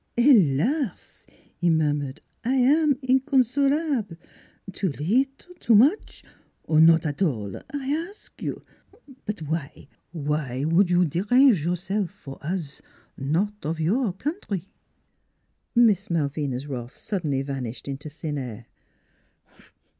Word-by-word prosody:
" - - -47
Helas! 235 - +2
" - - -33
he 175 - +3
murmured. 145 -4 0
" - - -46
I 250 +3 +1
am 285 +2 +4
inconsolable! 265 - +1 0.6
Too 190 - -1
leetle? 265 - -1
Too 230 - +4
much? 280 - +3 0.4
or 155 -1 +2
not 165 +1 +6
at 145 +3 -3
all 110 - -1 0.2
I 275 -2 -4 0.2
ask 410 - -18
you? - - -4 0.6
But 205 -6 -4
w'y?... 145 -2 -5 0.2
W'y 150 -5 -2
s'ould 170 +5 +3
you 180 0 +4
derange 205 - +4
yourself 180 +3 -1
for 135 -2 -11
us 155 -3 -4 0.3
not 185 +10 -1
of 160 +2 -3
your 200 +6 +1
country?" 200 - -4 1.1
Miss 215 -5 +4
Malvina's 145 -4 -1
wrath 125 -3 -6
suddenly 155 -10 -2
vanished 135 -4 -5
into 140 +2 -5
thin 150 -1 -5
air. 120 -3 -7
175 Hz, 125 wpm, -25 LUFS, 145-245 Hz, 1.1 s, not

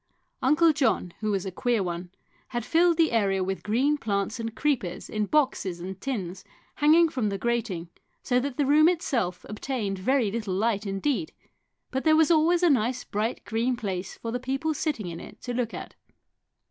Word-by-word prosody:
Uncle 310 +5 +4
John, 265 - +1
who 215 - -2
was 195 -2 -1
a 190 - -3
queer 235 +1 0
one, 175 0 -4 0.4
had 240 -2 -4
filled 335 +2 +3
the 330 -2 +3
area 195 -4 +2
with 190 +1 -3
green 270 +8 +1
plants 205 +1 -1
and 225 0 -4
creepers 235 -9 -1
in 210 -1 -1
boxes 255 - +1
and 190 +2 -7
tins 190 -9 -4 0.3
hanging 320 +3 +6
from 255 -9 -1
the 200 - -2
grating, 220 -6 -2 0.4
so 250 -1 +2
that 270 0 -4
the 290 - +2
room 305 +4 +6
itself 240 - -1
obtained 210 -3 -3
very 240 +1 +2
little 210 -4 -2
light 215 0 0
indeed, 270 +11 -1 0.6
but 265 - -2
there 315 -1 +5
was 320 +1 +4
always 335 +2 +4
a 350 - +6
nice 245 -1 +1
bright 215 +4 -3
green 235 +3 0
place 190 -4 -4
for 230 - -5
the 245 - -2
people 270 +5 -1
sitting 290 - -2
in 170 -1 -6
it - - -11
to 245 - -4
look 240 -2 -1
at. - - -7
235 Hz, 185 wpm, -27 LUFS, 195-285 Hz, 0.6 s, hanging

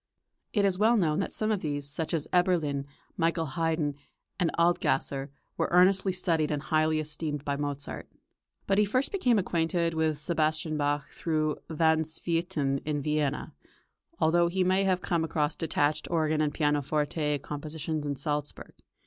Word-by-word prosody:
It 205 -3 +2
is 190 -1 +1
well 225 +3 +5
known 160 -4 +2
that 195 - -2
some 215 0 -1
of 210 - +1
these, 145 -4 -3
such 155 +2 -3
as 160 -3 -1
Eberlin, 165 -6 +2 0.3
Michael 165 0 +1
Haydn, 160 0 -1 0.5
and 175 -3 +2
Adlgasser, 160 -5 +1 0.3
were - - 0
earnestly 190 +2 +4
studied 170 -4 0
and 150 - -1
highly 155 +1 +1
esteemed 150 -1 -4
by 140 - 0
Mozart. 145 -1 -5 0.6
But 195 +1 +2
he 210 - +5
first 255 +7 0
became 255 - +2
acquainted 170 -2 0
with 160 -1 +1
Sebastian 155 0 0
Bach 145 0 -1
through 155 -2 -1
Van 160 0 +3
Swieten 160 -3 -1
in 150 -1 -1
Vienna, 150 -1 -1 0.7
although 170 +2 +4
he 185 +2 +1
may 190 +2 +2
have 185 -1 +1
come 170 -3 0
across 150 -1 0
detached 150 -1 0
organ 155 -2 +1
or 150 - +2
pianoforte 150 0 0
compositions 150 +1 -4
in 140 - -1
Salzburg. 145 0 -4
160 Hz, 155 wpm, -28 LUFS, 150-175 Hz, 0.7 s, well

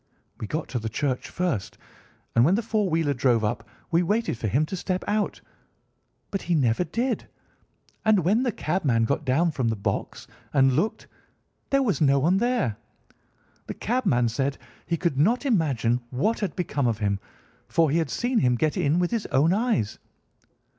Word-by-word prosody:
We 110 - -4
got 155 +7 -3
to 125 - -2
the 110 0 -4
church 130 +3 -2
first, 150 - -2 0.6
and 115 - +6
when 170 +8 +4
the 230 - -1
four 215 -3 0
wheeler 160 -3 +1
drove 120 -3 +2
up 105 - -2 0.2
we 170 +1 +4
waited 215 - 0
for 115 - -3
him 135 +9 +2
to 190 - -5
step 185 +1 -2
out, 210 0 -1 0.9
but 195 - -2
he 175 - 0
never 125 0 +2
did, 240 +7 -2 0.8
and 215 -5 +4
when 210 +7 +3
the 255 -2 +1
cabman 150 - 0
got 140 +5 -1
down 160 +6 +2
from 130 -5 -1
the 115 - 0
box 100 - -3 0.3
and 135 -2 +4
looked 180 +12 -1 0.6
there 275 0 +3
was 205 -9 0
no 140 -2 +4
one 165 +8 +3
there! 225 - 0 0.9
The - - -5
cabman 185 - +1
said 135 +4 -1
that - - -21 0.3
he 170 - 0
could 165 -6 -1
not 230 - +2
imagine 135 - +1
what 145 - 0
had 200 -6 -3
become 145 -7 -1
of 115 -3 0
him, 100 -2 -1 0.5
for 165 -4 +2
he 165 - +2
had 160 -4 -1
seen 245 0 0
him 125 -1 +3
get 155 +5 0
in 145 +4 +2
with 175 -1 +1
his 230 -3 -1
own 155 +6 +3
eyes. 215 - 0
155 Hz, 185 wpm, -25 LUFS, 125-200 Hz, 0.9 s, and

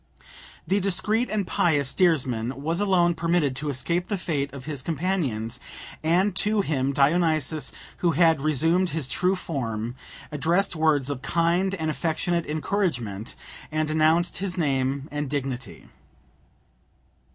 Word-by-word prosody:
The 195 +4 +2
discreet 210 +5 +2
and 210 -2 -1
pious 145 -7 +1
steersman 130 -7 +1
was 165 +3 -1
alone 180 -4 +3
permitted 165 -4 +1
to 150 +1 -2
escape 170 +6 -1
the 205 - -1
fate 145 -6 -2
of 135 -1 -9
his 145 -4 -4
companions, 140 - -2 0.4
and 175 +5 +2
to 210 +1 +3
him 140 -6 0
Dionysus, 155 -1 +2 0.3
who 170 -2 +1
had 165 -2 +4
resumed 160 +5 +2
his 150 -3 -2
true 180 +8 +1
form, 120 - -3 0.4
addressed 170 +6 +1
words 150 -4 +2
of 135 -2 -5
kind 175 +5 +1
and 160 -3 -1
affectionate 170 +2 -1
encouragement, 150 - -2 0.4
and 155 0 0
announced 160 +3 +2
his 190 -1 -3
name 135 -3 0
and 145 -1 -3
dignity. 130 - -4
155 Hz, 130 wpm, -25 LUFS, 135-175 Hz, 0.4 s, had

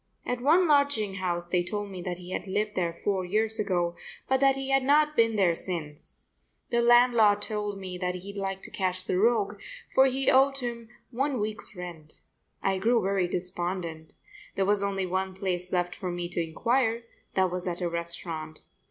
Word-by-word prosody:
At 245 0 -2
one 335 +7 +4
lodging 280 -9 +3
house 175 -2 -2
they 175 0 +1
told 205 +2 -4
me 185 -2 -6
that 175 0 -4
he 180 0 -10
had 195 - -4
lived 210 +2 -1
there 170 -2 -2
four 195 -2 +1
years 215 +4 0
ago 175 -4 0 0.3
but 265 0 +2
that 270 0 +4
he 270 0 -3
had 270 0 +4
not 300 +3 +3
been 230 -3 +3
there 185 -5 +3
since. 165 -4 -6 0.5
The 235 0 +3
landlord 235 -4 +5
told 210 -2 -3
me 185 -2 -6
that 180 0 -1
he'd 195 +3 -8
like 195 -1 -3
to - - -8
catch 185 -1 -2
the 185 0 0
rogue, 210 -2 +2 0.3
for 265 0 +6
he 270 +1 +2
owed 270 +1 +4
him 235 -3 -5 0.2
one 265 +1 -1
week's 215 0 -4
rent. 170 -4 -9 0.4
I 195 -1 +1
grew 230 +4 +3
very 195 -2 +1
despondent. 175 -2 -4 0.4
There 195 - +1
was 205 0 +2
only 195 -1 -1
one 190 +1 -2
place 185 -2 -3
left 175 -1 0
for 185 -4 -5
me 175 0 -3
to 175 - -2
inquire; 230 +7 0 0.3
that 185 -1 +2
was 180 0 -2
at 175 -1 -2
a 175 - -1
restaurant. 170 -2 -4
195 Hz, 190 wpm, -28 LUFS, 180-230 Hz, 0.5 s, for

